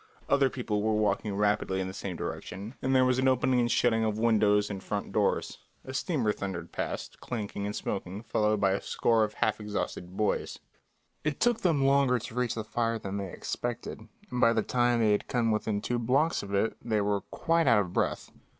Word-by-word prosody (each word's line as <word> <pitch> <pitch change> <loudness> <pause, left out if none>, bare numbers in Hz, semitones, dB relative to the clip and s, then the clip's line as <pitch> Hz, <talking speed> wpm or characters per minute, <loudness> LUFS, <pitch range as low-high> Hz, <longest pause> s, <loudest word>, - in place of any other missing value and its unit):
Other 140 -1 +4
people 115 -5 -2
were 110 0 +1
walking 105 -1 0
rapidly 105 -2 +1
in 95 - -2
the 95 - -6
same 95 -2 -5
direction, 100 +6 -6
and 130 0 +1
there 130 0 +5
was 130 0 +2
an 130 - +2
opening 130 0 +3
and 120 -1 +2
shutting 115 -2 +2
of 110 -1 0
windows 105 -2 +3
and 100 -2 -5
front 100 +1 -3
doors. - - 0 0.3
A 130 - -7
steamer 135 -6 0
thundered 90 -5 -5
past, - - -4
clanging 105 -4 -4
and 105 - -4
smoking, 95 +1 -4
followed 105 -1 +1
by 100 -1 +3
a 95 - 0
score 115 -1 +2
of 105 0 -2
half 110 - 0
exhausted 100 -3 -4
boys. 105 -1 0 0.7
It 150 -2 -1
took 240 -1 +3
them 160 -7 +2
longer 135 -2 +4
to 115 - -7
reach 125 -1 -1
the 110 - -3
fire 115 +1 -1
than 100 -2 -5
they 95 -2 -4
expected, 120 -1 -5 0.2
and 125 0 -2
by 115 - +6
the 110 -2 +1
time 120 0 +2
they 110 -2 +4
had 105 - 0
come 115 -2 +1
within 105 -1 -1
two 120 +2 -1
blocks 135 +8 +2
of 100 - -8
it 100 +3 +1
they 110 -3 +1
were 100 -1 0
quite 165 -1 0
out 115 -4 +6
of 90 -3 -5
breath. - - -1
110 Hz, 210 wpm, -29 LUFS, 105-125 Hz, 0.7 s, by